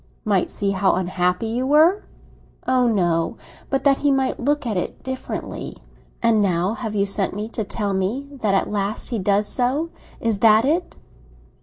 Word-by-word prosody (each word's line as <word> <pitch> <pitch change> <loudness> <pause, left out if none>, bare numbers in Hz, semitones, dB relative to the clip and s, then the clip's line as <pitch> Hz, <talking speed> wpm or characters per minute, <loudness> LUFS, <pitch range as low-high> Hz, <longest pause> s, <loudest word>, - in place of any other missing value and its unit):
"Might 200 -4 +1
see 200 -1 -1
how 195 0 +2
unhappy 180 +2 0
you 240 +4 -1
were?" 320 +8 +4 0.6
"Oh 255 -1 +3
no! 175 -7 +1 0.3
But 270 - 0
that 275 -1 +4
he 290 - +2
might 270 -1 0
look 290 +2 0
at 225 -3 -1
it 180 - -4
differently." 260 0 -5 0.5
"And 225 -2 +4
now 180 -2 +1
you 220 - -2 0.2
have 200 - +2
sent 195 0 +2
for - - -8
me 210 +1 -3
to 225 - -3
tell 205 0 -3
me 205 +9 -1
that 200 -3 +2
at 195 - 0
last 205 0 -2
he 235 -4 -2
does 200 +2 +1
so. 270 +9 0 0.3
Is 225 -3 -1
that 220 +1 +5
it?" 330 +6 0
215 Hz, 180 wpm, -22 LUFS, 195-260 Hz, 0.6 s, that